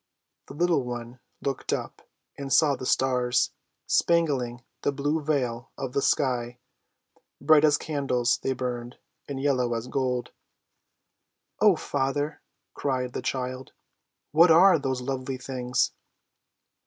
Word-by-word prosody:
The - - -10
little 170 -2 +2
one 120 0 -6 0.2
looked 135 -2 -2
up, - - -3 0.3
and 140 -1 -6
saw 145 -1 +4
the 130 - -6
stars, 125 -1 +2 0.3
spangling 135 -8 +1 0.2
the - - +1
blue 145 +3 -1
veil 125 -6 -1
of 135 -2 -5
the 140 - +1
sky; 125 -4 0 0.8
bright 155 -1 +5
as 150 -1 +5
candles 135 -6 0
they 135 - 0
burned, 125 -1 -5 0.3
and 140 -1 -4
yellow 130 -4 +1
as 115 0 -3
gold. 125 -2 -1 1.3
"Oh, - - +6
father," 145 +2 -2 0.3
cried 130 -3 -2
the - - -3
child; 130 0 -4 0.6
"what 165 +3 +6
are 170 +1 +7
those 130 -2 -2
lovely 130 0 -3
things?" 125 -1 -1
130 Hz, 125 wpm, -26 LUFS, 125-145 Hz, 1.3 s, are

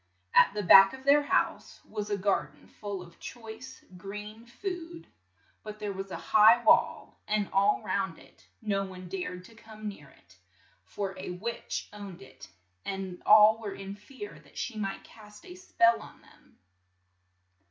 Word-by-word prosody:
At 200 - +5
the 210 - -2
back 195 +2 +8
of 265 0 -10
their 285 +2 +5
house 290 - -1
was 210 -1 -5
a 205 - 0
gar 200 0 +1
den - - -22
full 200 -3 -7
of 170 -1 -17
choice 230 +1 -10
green 210 +4 -9
food, 340 +4 -6 0.6
but 215 -1 -8
there 210 -1 -4
was 195 0 -6
a - - -5 0.2
high 220 +3 +7
wall 220 - +2 0.3
all 200 +2 +3
round - - -2
it - - -20
and 215 - -8
no 195 0 +1
one 185 -1 -9
dared 180 0 -5
to 230 - -16
come 220 -1 -10
near 150 -9 -9
it, 95 - -23 0.5
for 195 -2 -5
a - - -6
witch 205 +7 -5
owned 200 -6 -9
it, 130 - -14 0.4
and 190 -2 -5
all 215 +1 +7
were 210 -3 -6
in 195 0 -7
fear 205 - -11
that 150 - -20
she 245 - -4
might 195 -2 -4
cast 210 -2 -16
a 360 - -10
spell 235 -11 +2
on - - -13
them. - - -23
210 Hz, 170 wpm, -29 LUFS, 195-225 Hz, 0.6 s, back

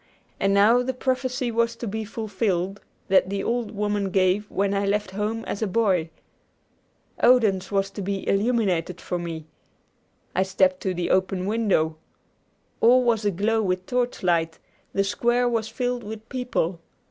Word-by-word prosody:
And 195 - +2
now 210 +5 +5
the 255 0 -2
prophecy 255 -1 -1
was 230 0 +1
to 235 - -6
be 220 +2 -3
fulfilled 205 -3 -2 0.3
that 190 -1 +4
the 195 0 -2
old 235 -2 -1
woman 205 -1 -1
gave 190 +2 +1
when 200 0 0
I 200 0 0
left 200 -1 0
home 210 +3 -3
as 200 - -4
a 220 - +1
boy. 185 -5 +1 1.1
Odense 210 -6 +4
was 195 0 0
to 200 - -6
be 195 0 -3
illuminated 195 -5 +1
for 180 - -3
me. 165 -2 -5 0.9
I 185 - +3
stepped 190 -1 +2
to 185 -2 -1
the 175 0 -1
open 185 0 +1
window. 195 -7 +1 0.8
All 250 +2 +5
was 230 -3 +1
aglow 205 +3 +1
with 185 -2 -1
torchlight, 175 -10 0 0.3
the 195 - +1
square 240 +5 +1
was 230 -2 0
filled 245 0 -2
with 220 +1 -8
people. 245 -9 -2
205 Hz, 155 wpm, -24 LUFS, 190-230 Hz, 1.1 s, now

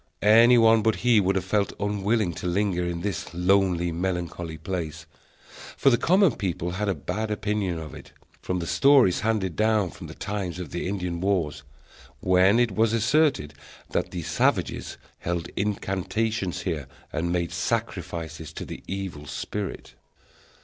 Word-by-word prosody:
Any 115 +4 +7
one 115 -1 +6
but 110 0 +2
he 120 -3 +6
would 95 0 +1
have 95 -1 -1
felt 100 +1 0
unwilling 105 -1 0
to 90 - -5
linger 90 0 0
in 85 -1 -3
this 95 -3 -4
lonely, 90 -1 +2
melancholy 85 -2 -3
place, 80 -1 -5 0.7
for 135 - +4
the 120 - +4
common 185 +3 +4
people 90 -3 -2
had 100 +3 -2
a 95 - +1
bad 95 +9 -3
opinion 105 -4 -1
of 80 -3 -7
it, - - -12 0.3
from 90 - -2
the 85 - -3
stories 135 - +5
handed 105 -5 0
down 110 -4 +2
from - - -10
the - - -10
times 95 -4 -4
of 90 -5 -7
the 85 - -3
Indian 90 -3 -3
wars, 90 -7 0 0.6
when 95 +6 +4
it 120 -3 +2
was 110 +3 +2
asserted 120 - +2 0.4
that - - -1
the 90 -2 -5
savages - - 0 0.2
held 85 -1 -3
incantations 100 0 -1
here 80 -8 -3 0.3
and 85 +2 -1
made 85 -1 -1
sacrifices 80 -2 -3
to - - -6
the - - -8
Evil 95 -7 -5
Spirit. 100 +6 -5
95 Hz, 155 wpm, -25 LUFS, 85-105 Hz, 0.7 s, Any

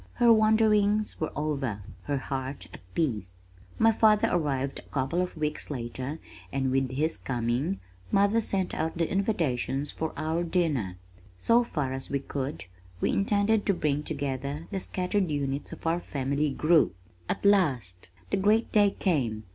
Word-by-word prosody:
Her 235 -1 +6
wanderings 215 -1 +3
were 160 - -1
over, 135 -9 -2 0.2
her 145 -1 0
heart 135 0 -4
at - - -9 0.2
peace. 105 - -1 0.4
My 225 0 +5
father 215 -1 +4
arrived 140 -5 0
a - - -16
couple 140 +6 0
of 180 -2 -4
weeks 150 -1 -2
later, 130 +2 -4 0.3
and 135 -1 0
with 135 0 +1
his 155 +4 0
coming, 120 -4 -1 0.3
mother 200 +3 +4
sent 190 -4 -1
out 160 +1 -2
the 165 -1 0
invitations 145 - 0
for 160 0 -3
our 160 +3 0
dinner. 150 - 0 0.4
So 235 - +4
far 150 - -2
as 135 0 -6
we 140 - +1
could, 140 -1 -4 0.3
we - - +1
intended 205 +1 +2
to 200 - +3
bring 150 -3 0
together 140 0 -3
the 195 - -1
scattered 185 0 -1
units 140 -1 -2
of - - -10
our 165 +1 +2
family 140 -1 -1
group. 155 +3 +3 0.3
At - - -2
last 130 - +2 0.2
the - - +2
great 210 +4 +2
day 205 -1 +5
came! 125 - 0
150 Hz, 155 wpm, -28 LUFS, 135-195 Hz, 0.4 s, Her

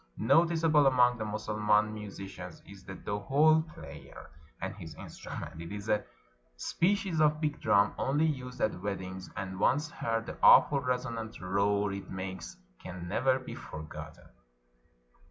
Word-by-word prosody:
Noticeable 160 +2 +4
among 125 -2 +4
the 110 - -2
Mussulman 105 0 +1
musi 105 -2 -7
cians 90 -3 -10
is 100 -1 -13
the 95 - -8
dohol 145 +12 +3
player 70 +1 -11 0.3
and 95 - -4
his 85 -6 -9
instrument. 80 - -8
It 85 - -7
is 105 +1 -6
a 105 0 +2 0.5
species 180 - 0
of 150 0 +4
big 150 -1 -2
drum, 100 0 +4
only 145 +4 +2
used 125 -5 -3
at 105 -4 0
weddings; 95 -2 -5
and, 95 -1 -5
once 150 +8 +2
heard, 115 0 -2
the - - -8
awful 140 - +7
resonant 125 -3 -3
roar 100 +2 +1
it 100 0 -7
makes 95 -2 -6 0.2
can 90 -1 -7
never 130 +8 +2
be 130 - -8
forgotten. 75 0 -9
105 Hz, 145 wpm, -31 LUFS, 95-135 Hz, 0.5 s, awful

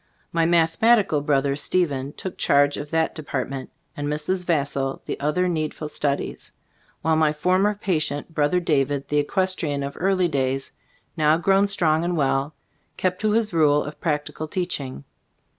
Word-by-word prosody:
My 165 -1 +2
mathematical 170 +1 +3
brother, 140 -1 +1
Ste 175 +5 +2
phen, 140 0 -5
took 190 - -5
charge 145 0 +3
of 145 - -6
that 160 0 +1
department, 135 -3 -4 0.3
and 145 0 -3
Mrs. 155 +5 -1
Vassall 140 -5 -1
the - - -4
other 150 +6 +1
needful 155 -2 -2
studies, 145 -1 -2 0.5
while 160 0 +3
my 155 -1 +3
former 185 +7 +1
patient, 165 -6 -2
brother 155 +3 +2
David, 145 -4 0
the 150 - +1
equestrian 155 -3 0
of 140 0 -4
early 185 0 +2
days, 135 -3 -1 0.4
now 155 0 +3
grown 195 +4 +3
strong 165 -5 +1
and 175 0 -1
well, 140 +1 0 0.4
kept 185 0 -1
to 215 -1 +2
his 220 -3 +1
rule 150 -3 +4
of 150 - -9
practical 155 -1 -2
teaching. 150 - -4
155 Hz, 155 wpm, -23 LUFS, 145-180 Hz, 0.5 s, rule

